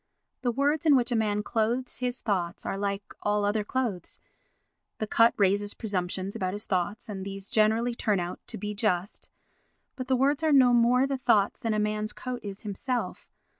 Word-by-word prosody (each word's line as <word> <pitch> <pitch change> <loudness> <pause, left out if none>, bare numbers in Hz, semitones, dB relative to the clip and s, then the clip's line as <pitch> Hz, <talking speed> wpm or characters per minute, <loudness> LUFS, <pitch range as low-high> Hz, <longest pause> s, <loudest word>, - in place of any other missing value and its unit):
The 245 - +1
words 290 +6 +1
in 290 - +7
which 245 -1 +2
a - - +2
man 210 -2 +1
clothes 235 +4 -1
his 250 -1 -2
thoughts 180 -5 -2
are - - -2
like 200 0 -2 0.2
all 205 0 +1
other 210 +1 +1
clothes—the 215 -1 -6
cut 230 +2 +4
raises 205 +1 +2
presumptions 190 -2 -3
about 185 -1 -2
his 210 +2 -4
thoughts, 190 +4 -2
and 195 -3 -5
these 195 0 -7
generally 220 +3 +2
turn 210 -4 0
out 175 0 -4
to - - -5
be 210 +2 -4
just, 200 -3 -1 0.7
but 255 -1 -5
the 265 - +3
words 275 +3 +2
are 315 -1 +2
no 255 -3 +6
more 240 +2 +4
the 275 0 -2
thoughts 230 -6 +2
than 225 -2 -1
a - - +1
man's 210 0 -1
coat 255 -1 -5
is 200 -1 -7
himself. 240 +5 -3
215 Hz, 185 wpm, -28 LUFS, 200-245 Hz, 0.7 s, in